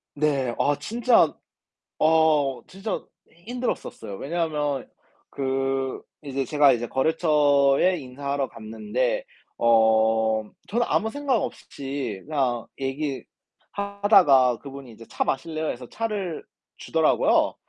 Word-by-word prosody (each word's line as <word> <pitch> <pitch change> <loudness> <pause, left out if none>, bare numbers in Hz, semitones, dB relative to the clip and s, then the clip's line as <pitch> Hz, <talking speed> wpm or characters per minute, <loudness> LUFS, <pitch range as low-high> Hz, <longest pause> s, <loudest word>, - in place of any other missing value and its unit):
네, 140 -4 0
아 145 - +2
진짜 235 +10 +3 0.7
어 155 -5 +3
진짜 195 +2 -5 0.4
힘들었었어요. 245 - -4
왜냐하면 150 - -2 0.4
그 135 -1 -2 0.2
이제 135 -2 -3
제가 145 +1 +4
이제 120 0 -2
거래처에 145 +3 +3
인사하러 140 +1 -3
갔는데 215 - -2 0.3
어 110 -1 +3 0.2
저는 235 +3 0
아무 220 - +1
생각 280 0 0
없이 135 -7 -5
그냥 130 -6 -1
얘기하다가 145 - +1
그분이 135 -3 -10
이제 115 +1 -13
"차 - - -1
마실래요?" 155 +3 -2
해서 125 0 -6
차를 205 -7 -3 0.3
주더라고요. - - +2
140 Hz, 240 characters per minute, -25 LUFS, 130-170 Hz, 0.7 s, 제가